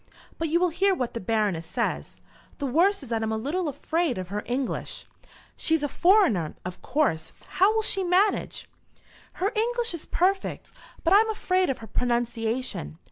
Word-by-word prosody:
But 325 -1 -1
you 335 +3 +3
will 360 0 +3
hear 385 +4 +2
what 250 -7 -3
the 235 - -3
Baroness 200 -6 0
says. - - -3 0.4
The 285 - -3
worst 340 +7 +2
is 260 - -10
that 225 -1 0
I - - 0
am 220 - -2
a 220 - 0
little 310 +10 -2
afraid 320 - -1
of 185 -1 -5
her 205 +1 -2
English." 255 +1 -2 0.5
"She's 320 -2 +1
a - - +2
foreigner, 345 - +3
of 180 0 -6
course. 255 - 0
How 390 +3 +3
will 440 - +2
she 390 -2 +1
manage?" 370 +4 +1 0.7
"Her 390 +3 -1
English 470 0 0
is 335 - -7
perfect, 380 +2 0 0.3
but 340 - +4
I - - +9
am 445 +1 +2
afraid 370 -4 +1
of 265 - 0
her - - -13
pronunciation. 235 - -2
305 Hz, 185 wpm, -26 LUFS, 225-370 Hz, 0.7 s, I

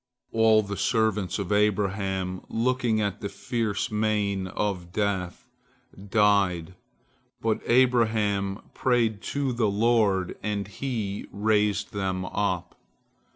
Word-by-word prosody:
All 110 -1 +4
the 100 0 -5
servants 105 -2 +1
of 100 -1 -4
Abraham, 95 -3 0
looking 120 -1 +1
at 100 +1 -2
the 100 - -3
fierce 110 0 -2
mien 105 -3 0
of 95 -2 -3
Death, 95 -3 -2 0.6
died, 100 -5 +2 0.7
but 110 -1 0
Abraham 110 -5 +2
prayed 115 -5 +1
to 140 -3 -2
the 115 -3 +1
Lord, 100 -3 +2
and 105 -2 -2
he 105 -2 -4
raised 105 -1 +1
them 95 -2 -2
up. 90 -3 -2
105 Hz, 110 wpm, -26 LUFS, 95-110 Hz, 0.7 s, All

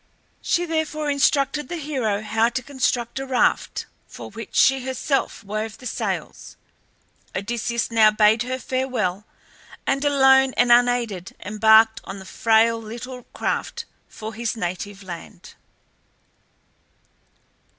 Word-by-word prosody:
She 350 0 0
therefore 310 -2 -1
instructed 280 0 +1
the 350 - -3
hero 255 -9 -2
how 220 +2 +2
to 255 +1 -4
construct 250 -2 -1
a 270 - -4
raft, 260 -1 +1 0.2
for - - -10
which - - -9
she 265 -1 +4
herself 265 -1 -2
wove 215 +2 -4
the 255 - -14
sails. 240 - -4 0.8
Odysseus 235 +4 -2
now 220 -2 +6
bade 215 +1 +4
her 255 +1 -2
farewell, 250 -8 -2 0.6
and 275 +1 0
alone 265 -2 +4
and 245 0 +4
unaided 240 -6 +2
embarked 220 +2 +5
on 195 - -7
the 190 - -10
frail 225 +3 +2
little 240 +3 -8
craft - - -2 0.2
for 220 +1 -8
his 230 +1 -3
native 195 +1 -5
land. 175 -3 -10
235 Hz, 120 wpm, -23 LUFS, 215-265 Hz, 0.8 s, now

